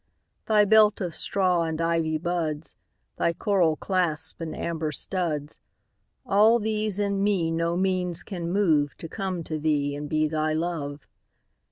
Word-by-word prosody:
Thy 210 -1 +5
belt 215 0 +5
of 180 -4 -3
straw 185 -3 +1
and 160 -1 -2
ivy 165 -1 +1
buds, 160 -2 -2 0.4
Thy 170 - +1
coral 180 -6 +2
clasps 170 -4 -2
and 165 -1 -4
amber 160 -2 -2
studs,—All 185 - -1
these 215 -2 -1
in 200 -1 0
me 190 -5 +1
no 165 +1 0
means 180 -2 0
can 175 -4 -5
moveTo 160 -5 +1
come 190 -4 -3
to 155 -1 -4
thee 145 -2 0
and 145 0 -6
be 155 0 +2
thy 155 0 0
Love. 155 -4 -3
170 Hz, 140 wpm, -26 LUFS, 155-195 Hz, 0.4 s, Thy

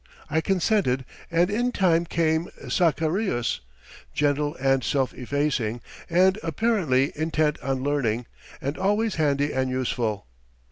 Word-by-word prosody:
I 160 +2 +2
consented, 180 - +1 0.2
and 175 +2 +2
in 240 +4 +1
time 175 -6 +2
came 160 0 +1 0.2
Sacarius, 160 - +1 0.6
gentle 145 +1 +1
and 135 0 +1
self 135 -2 0
effacing, 130 -3 -1 0.3
and 185 +4 +4
apparently 160 - +1
intent 155 -1 0
on 130 0 -2
learning, 125 -5 0 0.3
and 140 +3 -4
always 205 +1 +1
handy 145 -2 +1
and 130 0 0
useful. 120 - -1
150 Hz, 120 wpm, -25 LUFS, 130-175 Hz, 0.6 s, and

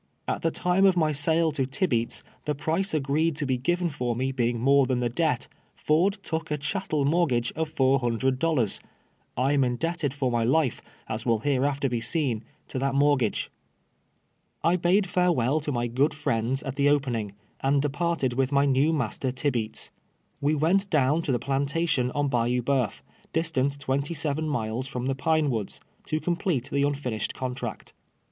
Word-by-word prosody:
At - - -1
the 165 - +2
time 180 +3 +1
of 185 -2 +3
my 155 -2 +3
sale 160 +3 +2
to 135 -3 -1
Tibeats, 130 -5 -1 0.2
the 150 - -1
price 165 +7 0
agreed 155 +2 +1
to 145 - -2
be 130 -2 0
given 175 +5 0
for 125 -5 -2
me 130 +2 -1
beini;; 120 -2 0
more 135 +3 +4
than 125 -1 0
the 120 -1 0
debt, 120 - 0 0.3
Ford 180 +7 +2
took 160 0 -3
a 150 - 0
cliattel 150 -1 -1
moi 170 +4 +3
tgafre 120 -3 0
of 160 -1 -3
four 135 -2 +3
hundred 130 +2 0
dollars. 140 -10 +1 0.6
I 130 +3 +2
am 140 - +3
iiidel)ted 145 +4 -1
f 140 0 -6
)r 125 - +2
my 120 -1 +1
life, 130 +1 +1 0.3
as 110 +1 -3
will 115 -3 +1
hereai'ter 140 +1 +1
be 120 -2 -2
seen, 125 -6 -1 0.3
to 130 - -3
that 135 +1 0
mortixage. 140 -5 +2 1.1
I 170 +2 +4
bade 180 +3 +3
tarewe'll 170 -7 +2
to 145 - -2
my 120 -2 -1
::;(>od 135 +5 +1
friends 125 -2 -1
at 135 -1 -5
the 140 0 +4
opening, 120 -8 0 0.3
and 140 +1 +2
departed 145 -1 0
with 130 +2 0
my 140 0 +3
neM' 145 +4 +3
master 130 +1 -2
Tibeats. 125 -5 -1 0.5
AVe 145 +2 +2
went 185 +7 +2
down 150 +1 +2
to 150 - -2
the 125 - +2
i>lantation 140 -1 +1
on 145 0 +1
Bayou 125 -1 +1
Boeuf, 125 -5 0 0.3
distant 145 -4 0
twenty 140 +4 -1
seven 155 +1 -1
miles 120 -1 -2
from 125 -1 -4
the 135 - +1
Pine 155 +2 +1
AVoods, 110 -4 -3 0.3
to 155 - 0
complete 170 -6 -1
the 140 - +1
nntinished 140 -6 -1
contract. 125 -3 -5
140 Hz, 180 wpm, -26 LUFS, 125-155 Hz, 1.1 s, more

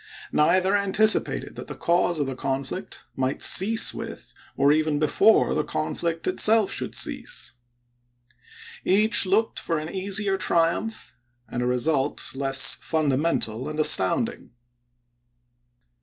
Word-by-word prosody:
Neither 185 +5 +2
anticipated 205 +2 +2
that - - -8
the - - -8
cause 170 -1 0
of 145 - 0
the 135 - -4
conflict 135 +7 -5
might 130 +1 -2
cease 220 +4 +4
with, - - -9 0.2
or 140 +1 +3
even 155 0 +1
before, 175 +9 +3
the - - 0
conflict 165 +2 -3
itself 215 +2 +2
should - - -2
cease. - - -2 1.3
Each 210 +1 +3
looked 215 +4 0
for 165 - -2
an 155 +1 -6
easier 195 +1 -1
triumph, 180 +5 -1 0.3
and 120 - -5
a 125 - -1
result 135 +3 0
less 135 0 +2
fundamental 145 -5 -1
and 155 0 -6
astounding. 225 - 0
165 Hz, 120 wpm, -24 LUFS, 140-195 Hz, 1.3 s, cease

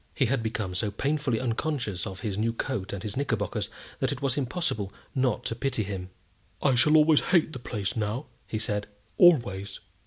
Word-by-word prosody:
He 135 - +3
had 125 +1 +1
become 110 -4 -2
so 90 +4 0
painfully 140 +2 0
unconscious 120 - -1
of 95 -1 -7
his 100 -2 -2
new 115 +3 0
coat 115 -5 -3
and 100 -1 -5
his 105 -2 -4
knickerbockers 115 -8 -1 0.3
that - - +1
it - - -3
was 135 -3 0
impossible 130 - -1 0.2
not 130 -4 +1
to 115 - -1
pity 125 -2 0
him. 95 -2 -5 0.5
"I 135 - +3
shall 150 +6 +5
always 155 0 +6
hate 170 -3 +2
the 130 - -5
place 105 -4 -3
now," 110 +5 -1 0.2
he 110 - -2
said, 105 -2 -1 0.3
"always." 100 - +4
115 Hz, 185 wpm, -28 LUFS, 105-135 Hz, 0.5 s, always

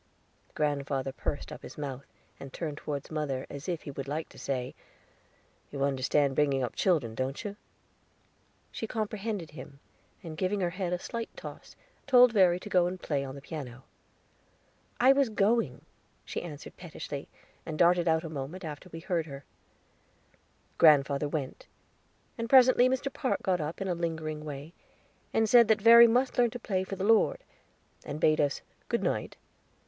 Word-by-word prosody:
Grandfather 140 -2 -1
pursed 145 +2 -4
up - - -8
his - - -11
mouth, 140 -2 -6 0.3
and 135 - -9
turned 150 -2 -5
toward 145 0 -5
mother, 145 -4 -2
as 140 +5 -6
if 170 -3 -3
he 145 - -6
would 135 0 -6
like 155 +3 -3
to - - -14
say: 130 -2 -3 1.0
"You 140 -1 -3
understand 140 +1 +1
bringing 135 -2 +2
up 120 - -4
children, 150 - +1
don't 130 +4 -3
you?" 205 -1 -5 1.2
She 225 - -5
comprehended 215 -4 -3
him, 145 -2 -11 0.4
and, 160 -2 -7
giving 185 +5 -1
her 175 -1 0
head 180 -1 -3
a 180 - +1
slight 230 +5 -5
toss, - - -10 0.3
told 250 -3 +7
Verry 180 -4 +4
to - - -8
go 180 -3 +3
and 185 +1 -5
play 145 -5 -1
on 135 0 -7
the 140 - -11
piano. 130 -6 -7 1.2
"I 260 +2 +7
was 275 -3 +2
going," 205 - +1 0.4
she - - -4
answered 150 -4 -9
pettishly, 150 -4 -7 0.3
and 155 -2 -5
darting 175 +1 +4
out 160 0 +2
a - - -5
moment 155 +5 -6
after 155 +4 -8
we 165 -1 -8
heard 170 -2 -1
her. 140 -1 -9 1.3
Grandfather 145 -2 +5
went, 145 -3 -5 0.7
and 230 0 -3
presently 255 -1 +6
Mr. 260 +1 -2
Park 260 - -1
got 185 -4 +1
up 155 +2 -4
in 195 - -3
a 180 - 0
lingering 160 -3 -3
way, 145 +2 -7 0.7
said 235 +1 +6
that 220 -1 +3
Verry 235 +1 +10
must 250 +3 +1
learn 240 -1 +5
to 245 - -7
play 190 -4 -1
for 190 +1 -5
the 190 - -4
Lord, 225 - +3 0.6
and 145 - -6
bade 155 0 +3
us 145 -2 -1 0.3
"Good - - 0
night." - - -2
165 Hz, 170 wpm, -29 LUFS, 140-205 Hz, 1.3 s, Verry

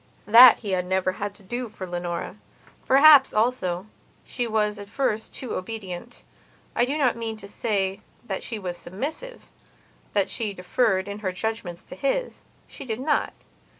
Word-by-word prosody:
That 230 +4 +9
he 205 -4 -4
had 180 -1 0
never 185 0 +1
had 200 +2 -5
to 205 - -15
do 240 +4 -4
for 195 -3 -7
Leonora. 175 -1 -4 0.5
Perhaps, 275 0 +7
also, 210 -6 0 0.4
she 245 -2 -3
was 210 -2 0
at 200 0 -9
first 225 -5 -1
too 255 - -5
obedient. 205 +2 -6 0.5
I 240 - +3
do 280 +4 -2
not 260 -5 +2
mean 225 -1 -4
to 200 - -11
say 200 -2 -2 0.2
that 195 -4 -4
she 230 - -4
was 180 -4 -5
submissivethat 305 - -6 0.8
she 220 -4 -2
deferred, 190 +1 +1
in 200 +1 -6
her 190 -3 -2
judgements, 185 -3 -4
to - - -10
his. 285 - -2 0.3
She - - -9
did 230 -3 -4
not. 295 +3 0
215 Hz, 160 wpm, -25 LUFS, 190-245 Hz, 0.8 s, That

